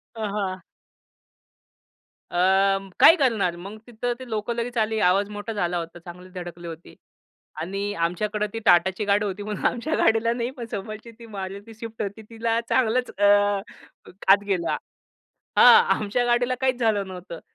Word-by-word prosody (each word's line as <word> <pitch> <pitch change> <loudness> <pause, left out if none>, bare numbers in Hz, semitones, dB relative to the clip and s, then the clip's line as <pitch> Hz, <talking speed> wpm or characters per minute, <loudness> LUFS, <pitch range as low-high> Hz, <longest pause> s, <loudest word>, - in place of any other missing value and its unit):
अ, 220 - -5
हां. 200 -2 -3 1.7
अ, - - -5 0.6
काय 330 - +9
करणार? 225 - +1
मग 195 +5 -9
तिथं 245 0 -3
ते 260 -1 -10
लोकं 220 +2 -2
लगेच 235 +1 -4
आली. 220 0 +1
आवाज 200 +1 +3
मोठा 205 +2 -5
झाला 175 -4 -1
होता. 170 +1 -7
चांगलीच 180 +2 -12
धडकली 175 -1 -8
होती. 165 +1 -10 0.7
आणि 195 +4 -3
आमच्याकडं 205 +5 -1
ती 225 - -4
टाटाची 190 +4 +4
गाडी 205 +1 +2
होती, 200 +1 -4
म्हणून 210 -1 -5
आमच्या 285 +7 -1
गाडीला 225 +1 +2
नाही, 235 +1 -2
पण 250 -3 -8
समोरची 215 +3 -6
ती 235 - -12
मारुती 200 +3 -7
स्विफ्ट 225 -1 -7
होती, 200 +2 -6
तिला 230 0 -1
चांगलंच 250 0 +1
अ, 205 - +2 1.1
आत 200 +1 +4
गेला. 180 -4 0 0.8
हां. 465 - +9
आमच्या 215 +4 -1
गाडीला 240 +1 +2
काहीच 260 -2 +1
झालं 215 -4 +1
नव्हतं. 180 -2 -9
210 Hz, 155 wpm, -24 LUFS, 190-230 Hz, 1.7 s, काय